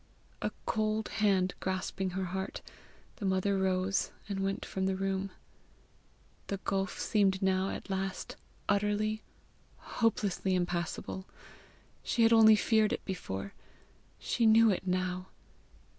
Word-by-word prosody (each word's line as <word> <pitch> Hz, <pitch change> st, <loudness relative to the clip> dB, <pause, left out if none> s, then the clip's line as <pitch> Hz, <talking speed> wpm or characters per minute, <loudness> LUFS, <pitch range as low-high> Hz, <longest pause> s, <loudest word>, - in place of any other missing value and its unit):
A -, -, 0 dB, 0.2 s
cold 215 Hz, 0 st, 0 dB
hand 195 Hz, -4 st, +2 dB
grasping 190 Hz, 0 st, -2 dB
her 190 Hz, -, -1 dB
heart, 190 Hz, +2 st, -4 dB, 0.5 s
the 210 Hz, -, -5 dB
mother 190 Hz, +1 st, +1 dB
rose, 190 Hz, 0 st, +1 dB, 0.2 s
and 200 Hz, -1 st, -3 dB
went 195 Hz, 0 st, -1 dB
from 190 Hz, 0 st, -2 dB
the 190 Hz, -, 0 dB
room. 195 Hz, 0 st, -1 dB, 1.2 s
The 200 Hz, -, -2 dB
gulf 195 Hz, -1 st, -2 dB
seemed 195 Hz, -3 st, +2 dB
now 190 Hz, 0 st, +2 dB
at -, -, -6 dB
last 190 Hz, -1 st, -3 dB, 0.3 s
utterly, 210 Hz, +1 st, +1 dB, 0.6 s
hopelessly 205 Hz, -4 st, 0 dB
impassable! 175 Hz, +1 st, -2 dB, 0.7 s
She 235 Hz, -, +1 dB
had 225 Hz, +1 st, +6 dB
only 220 Hz, -1 st, +8 dB
feared 215 Hz, 0 st, +3 dB
it -, -, -4 dB
before; 100 Hz, -, -5 dB, 0.6 s
she 230 Hz, -2 st, +1 dB
knew 225 Hz, 0 st, +7 dB
it 190 Hz, 0 st, -3 dB
now! 185 Hz, 0 st, -1 dB
195 Hz, 125 wpm, -31 LUFS, 185-210 Hz, 1.2 s, only